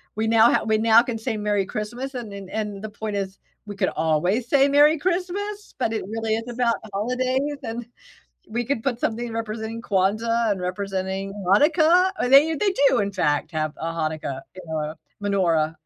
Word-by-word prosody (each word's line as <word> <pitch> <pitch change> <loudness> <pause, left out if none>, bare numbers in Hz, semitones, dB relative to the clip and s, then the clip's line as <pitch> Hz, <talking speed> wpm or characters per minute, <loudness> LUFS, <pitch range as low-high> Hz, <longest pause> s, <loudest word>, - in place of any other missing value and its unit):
we 220 +1 -1
now 225 +1 +6
ha - - +2
we 220 0 +2
now 225 +1 +6
can 235 -2 -3
say, 225 -1 -3
"Merry 205 -1 0
Christmas," 240 +7 -5
and 225 -5 -6
and 195 -1 -8
and 210 -2 -4
the 215 - -4
point 210 0 -5
is 195 -1 -3 0.3
we 205 - -6
could - - +1
always 175 +9 0
say, 280 -1 +5
"Merry 295 +3 +5
Christmas," 375 +5 -3
but 225 - 0
it 220 - -2
really 220 0 -1
is 225 +2 -5
about 240 -1 +1 0.2
holidays, 255 +6 -1
and 230 0 -5 0.6
we 240 +2 -2
could 245 -3 -2
put 245 -4 -1
something 235 +1 -2
representing 225 0 -4
Kwanzaa, 220 +3 +1
and 190 -2 -2
representing 190 +1 -3
Hanukkah. 320 - +4
Oh, 250 - 0
they 295 +4 +7
they 400 +4 +1 0.2
do, - - +2
in 200 0 0
fact, 150 -6 0
have 155 -1 -2
a 165 - -5
Hanukkah, 155 -4 -3
you 185 - -8
know, 155 -1 -3 0.3
menorah,. 165 -6 +1
220 Hz, 185 wpm, -23 LUFS, 195-250 Hz, 0.6 s, they